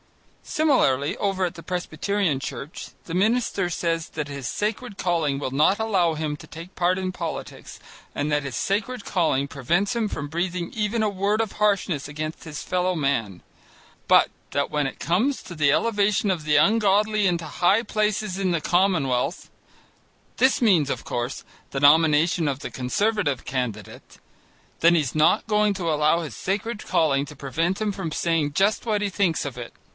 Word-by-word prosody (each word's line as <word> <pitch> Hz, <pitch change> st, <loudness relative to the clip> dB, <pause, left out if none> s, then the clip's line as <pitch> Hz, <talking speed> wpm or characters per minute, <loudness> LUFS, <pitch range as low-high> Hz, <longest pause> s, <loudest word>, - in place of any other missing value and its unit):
Similarly 150 Hz, -, +2 dB
over 195 Hz, -2 st, 0 dB
at 175 Hz, -, -3 dB
the 165 Hz, -, -11 dB
Presbyterian 180 Hz, -1 st, -1 dB
Church, 140 Hz, +3 st, -7 dB, 0.2 s
the 165 Hz, -, -7 dB
minister 205 Hz, -1 st, +1 dB
says 165 Hz, -1 st, -2 dB
that 150 Hz, -2 st, -4 dB
his 140 Hz, -3 st, -6 dB
sacred 210 Hz, -, -3 dB
calling 165 Hz, -6 st, 0 dB
will 140 Hz, -2 st, -3 dB
not 150 Hz, +9 st, +3 dB
allow 190 Hz, -7 st, +1 dB
him 155 Hz, -1 st, -2 dB
to -, -, -13 dB
take 165 Hz, +4 st, -11 dB
part 180 Hz, +1 st, +2 dB
in 185 Hz, -1 st, -2 dB
politics 170 Hz, -3 st, -6 dB, 0.4 s
and 145 Hz, +1 st, -1 dB
that 145 Hz, 0 st, +1 dB
his 140 Hz, -3 st, -5 dB
sacred 205 Hz, +4 st, -2 dB
calling 150 Hz, -6 st, +1 dB
prevents 170 Hz, -, 0 dB
him 225 Hz, -3 st, 0 dB
from 145 Hz, -, -4 dB
breathing 175 Hz, +2 st, -3 dB
even 220 Hz, +1 st, 0 dB
a -, -, +2 dB
word 200 Hz, +2 st, 0 dB
of 225 Hz, -2 st, -1 dB
harshness 200 Hz, -8 st, 0 dB
against 155 Hz, +2 st, -5 dB
his 150 Hz, -3 st, -7 dB
fellow 180 Hz, 0 st, 0 dB
man, 120 Hz, -, -1 dB, 0.6 s
but -, -, +5 dB, 0.2 s
that 140 Hz, -, -1 dB
when 150 Hz, -2 st, 0 dB
it 135 Hz, -, -8 dB
comes 215 Hz, -, 0 dB
to 180 Hz, -, -9 dB
the 150 Hz, -3 st, +3 dB
elevation 205 Hz, +2 st, +1 dB
of 170 Hz, -4 st, -2 dB
the 150 Hz, -1 st, +1 dB
ungodly 210 Hz, +3 st, +3 dB
into 170 Hz, -2 st, -1 dB
high 180 Hz, +8 st, +2 dB
places 210 Hz, -3 st, -1 dB
in 190 Hz, -1 st, +1 dB
the 170 Hz, -, +1 dB
commonwealth 165 Hz, -5 st, +1 dB, 0.9 s
(this 260 Hz, 0 st, +3 dB
means, 180 Hz, -, +4 dB
of -, -, -3 dB
course, 120 Hz, +2 st, -4 dB, 0.2 s
the 135 Hz, -, -3 dB
nomination 155 Hz, +3 st, +4 dB
of 135 Hz, -1 st, -3 dB
the -, -, -6 dB
Conservative 145 Hz, -, -1 dB
candidate) 125 Hz, -4 st, -5 dB, 0.6 s
then 170 Hz, +1 st, +5 dB
he's 150 Hz, -6 st, 0 dB
not 155 Hz, +9 st, +3 dB
going 210 Hz, -1 st, +2 dB
to 170 Hz, -4 st, -1 dB
allow 155 Hz, +3 st, +2 dB
his 160 Hz, -, -7 dB
sacred 205 Hz, +3 st, -3 dB
calling 140 Hz, -4 st, +2 dB
to 150 Hz, -, -11 dB
prevent 165 Hz, +8 st, -2 dB
him 215 Hz, -1 st, 0 dB
from 190 Hz, -5 st, -5 dB
saying 160 Hz, -2 st, 0 dB
just 195 Hz, +10 st, +1 dB
what 210 Hz, -2 st, +1 dB
he 205 Hz, -, 0 dB
thinks 180 Hz, -5 st, 0 dB
of 135 Hz, -3 st, -6 dB
it. 120 Hz, -1 st, -7 dB
175 Hz, 175 wpm, -24 LUFS, 150-205 Hz, 0.9 s, but